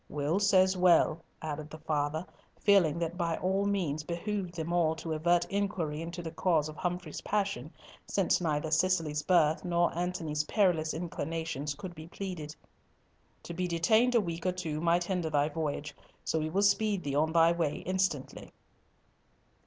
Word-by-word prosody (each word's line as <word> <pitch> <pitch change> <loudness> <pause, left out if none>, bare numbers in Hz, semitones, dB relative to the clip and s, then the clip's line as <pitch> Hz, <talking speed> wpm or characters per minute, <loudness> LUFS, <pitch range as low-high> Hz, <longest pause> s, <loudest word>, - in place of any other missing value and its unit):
"Will 150 +5 0
says 190 -2 +4
well," 170 -3 +4 0.2
added 155 -1 -4
the 155 - -9
father, 155 +1 -1 0.3
feeling 185 -6 +4
that 170 -1 -1
it 175 - -13
by 165 -1 0
all 195 +2 0
means 175 -7 0
behoved 175 +3 -4
them 165 +1 -3
all 165 -2 +2
to 160 0 -4
avert 175 +2 +2
inquiry 190 -7 -2
into 170 +1 -6
the 165 - -5
cause 165 -3 +1
of 155 - -8
Humfrey's 180 -2 -4
passion, 195 -9 -2 0.4
since 190 -1 +1
neither 155 -2 -1
Cicely's 160 -3 +1
birth 160 -3 +3
nor 175 -1 +1
Antony's 170 -4 -1
perilous 165 -6 +1
inclinations 160 -3 -3
could 185 +2 -7
be 155 -1 -10
pleaded. 170 -5 -6 0.9
"To 170 - -7
be 180 +1 -1
detained 220 +9 +3
a 235 - +5
week 170 -3 -5
or - - +3
two 160 -4 -4
might 170 +1 +3
hinder 175 -2 -1
thy 145 0 +2
voyage. 150 -1 -3 0.3
So 160 - 0
we 155 0 -2
will 195 +5 +1
speed 205 -2 +2
thee 140 - -3
on 155 +3 +2
thy 165 0 +5
way 165 -4 -1
instantly." 185 -7 -2
170 Hz, 170 wpm, -30 LUFS, 155-185 Hz, 0.9 s, a